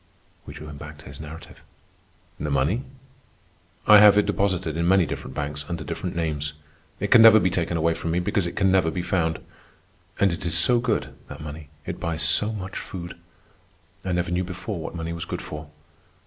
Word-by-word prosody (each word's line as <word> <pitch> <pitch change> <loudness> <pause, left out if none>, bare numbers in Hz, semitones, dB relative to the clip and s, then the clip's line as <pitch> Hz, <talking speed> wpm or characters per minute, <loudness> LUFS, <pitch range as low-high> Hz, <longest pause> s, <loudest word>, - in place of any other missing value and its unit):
We - - -8
drew 75 - -9
him 75 -2 -9
back 75 +1 -9
to 80 - -16
his 70 0 -11
narrative. 80 +1 -10 0.8
"The 75 - -3
money? 75 - +1 1.0
I 105 -1 +9
have 105 0 +8
it 105 - +4
deposited 95 -5 0
in 85 +1 0
many 95 -1 +5
different - - -6
banks 75 0 -3
under 85 -2 -3
different 90 +4 -4
names. 75 -3 -2 0.5
It 100 +1 -2
can 115 - +9
never 110 -1 +9
be 95 -2 +1
taken 85 -2 0
away 85 +1 +2
from 85 0 -4
me, 85 - 0
because 90 +1 0
it - - -6
can 95 -2 +3
never 95 -4 +3
be 85 +2 -3
found. 85 -3 0 0.8
And 100 -3 +3
it - - -6
is 85 0 +2
so 120 +9 +4
good, 120 -3 -1
that - - -9
money. 75 -1 -8 0.2
It - - -5
buys 85 -1 -1
so 105 +1 +3
much 95 -3 -5
food. 85 -1 -7 0.9
I 95 - -2
never 90 -1 0
knew 90 +1 +1
before 90 +1 -5
what 80 - -6
money 85 0 -4
was 85 0 -5
good - - -4
for." 75 0 -7
85 Hz, 205 wpm, -24 LUFS, 80-95 Hz, 1.0 s, I